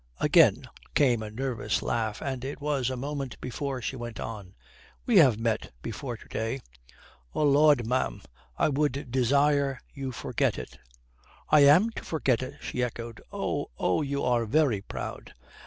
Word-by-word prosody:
Again - - +5 0.3
came 125 -6 +3
a 110 - -5
nervous 115 -2 -2
laugh, 110 -2 -2
and 130 -3 -3
it 135 +2 -5
was 145 -4 0
a 130 - -3
moment 140 -1 -4
before 130 0 -4
she 135 - -3
went 120 -2 -7
on. 105 -5 -7 0.5
"We 235 -5 +4
have 130 - +6
met 115 -1 -1
before 115 +2 -5
to - - -16
day." 115 +4 -3 0.8
"Oh - - +1
Lud, 145 -3 +5
ma'am, 115 - -1 0.3
I - - +3
would 140 -3 -1
desire 140 +2 +2 0.2
you 135 -2 -4
forget 125 - -1
it." - - -8 0.7
"I 150 - +7
am 180 +11 +6
to - - -7
forget 135 -7 0
it!" 130 +2 -6
she 125 - -3
echoed. 115 -1 -4
"Oh... - - -2
Oh, 90 - +1
you 140 -1 -2
are 120 -2 +1
very 130 -5 +2
proud." - - -7
130 Hz, 160 wpm, -28 LUFS, 115-140 Hz, 0.8 s, I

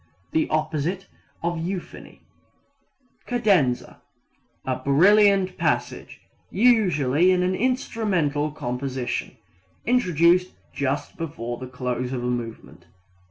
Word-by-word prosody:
The 160 - +1
opposite 155 +4 -1 0.4
of 170 0 -1
euphony. 185 +1 -7 1.0
Cadenza 195 - +1 0.6
A - - -1
brilliant 195 +5 +4
passage, 130 -2 -2 0.3
usually 180 - +3
in 180 -1 +3
an 185 +1 +1
instrumental 190 - 0
composition, 130 -2 -4 0.5
introduced 180 -6 +3 0.2
just 140 0 -2
before 120 -7 -5
the 130 - -7
close 125 0 -3
of 125 -2 -3
a - - -1
movement. 115 -8 -6
155 Hz, 95 wpm, -24 LUFS, 130-185 Hz, 1.0 s, brilliant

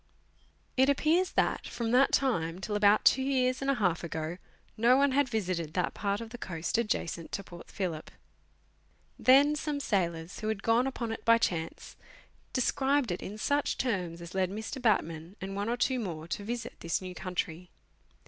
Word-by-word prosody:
It 265 +2 +5
appears 320 +6 +2
that, - - +1
from 230 -1 -3
that 255 +3 +5
time 175 -12 +1
till 210 +2 -3
about 205 0 +4
two 265 - +6
years 260 -1 +1
and 275 - -1
a 275 - +3
half 180 -8 0
ago, 160 +1 -4 0.4
no 240 +3 +5
one 280 0 +4
had 280 0 +2
visited 180 -8 -2
that 180 - 0
part 200 0 -1
of 225 -1 -8
the 245 - -8
coast 170 +3 -2
adjacent 170 -7 -2
to 200 - -3
Port 175 -2 -12
Phillip. 170 -5 -4 1.1
Then 280 +3 +6
some 300 -1 -2
sailors, 170 -8 -1
who 215 - -4
had 215 -2 -2
gone 230 +3 +3
upon 240 -4 -3
it 225 - -5
by 230 0 +6
chance, 165 -7 -3 0.5
described 265 -1 +1
it 175 - -3
in 205 +3 -6
such 285 +6 0
terms 180 -9 -2
as 170 - -9
led 190 -1 +1
Mr. 220 +6 -5
Batman 170 -6 0
and 195 +1 -5
one 205 +2 -2
or 240 - 0
two 255 +1 +1
more 165 -7 -5
to 200 - -3
visit 235 +3 -5
this 170 - -1
new 185 -1 -7
country. 180 -1 -4
210 Hz, 185 wpm, -30 LUFS, 175-255 Hz, 1.1 s, two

